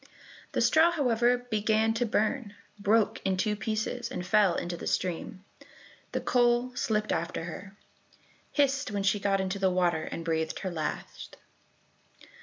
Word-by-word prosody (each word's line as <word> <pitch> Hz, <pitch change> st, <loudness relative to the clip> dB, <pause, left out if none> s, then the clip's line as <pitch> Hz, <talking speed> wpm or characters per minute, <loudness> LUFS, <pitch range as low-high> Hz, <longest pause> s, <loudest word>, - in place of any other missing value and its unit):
The -, -, +1 dB
straw, 320 Hz, +2 st, +5 dB
however, 245 Hz, -6 st, +2 dB
began 220 Hz, +1 st, +2 dB
to 235 Hz, +1 st, 0 dB
burn, 215 Hz, 0 st, -1 dB, 0.2 s
broke 210 Hz, +2 st, +2 dB
in 190 Hz, -1 st, 0 dB
two 210 Hz, +2 st, 0 dB
pieces, 220 Hz, +3 st, -3 dB
and 215 Hz, -9 st, -5 dB
fell 195 Hz, -1 st, +4 dB
into 175 Hz, 0 st, -3 dB
the -, -, -7 dB
stream. 185 Hz, +1 st, -2 dB, 0.7 s
The -, -, -2 dB
coal 240 Hz, 0 st, +2 dB
slipped 215 Hz, -3 st, 0 dB
after 165 Hz, 0 st, -2 dB
her, 190 Hz, +4 st, -8 dB, 0.7 s
hissed 275 Hz, -2 st, +1 dB
when 200 Hz, -1 st, -2 dB
she 200 Hz, +1 st, +2 dB
got 195 Hz, 0 st, +1 dB
into 190 Hz, +1 st, -2 dB
the 190 Hz, -1 st, +3 dB
water, 175 Hz, -3 st, +1 dB
and 165 Hz, -, -6 dB
breathed 160 Hz, -1 st, -1 dB
her 190 Hz, -, -3 dB
last. 155 Hz, -3 st, -5 dB
205 Hz, 150 wpm, -29 LUFS, 185-235 Hz, 0.7 s, straw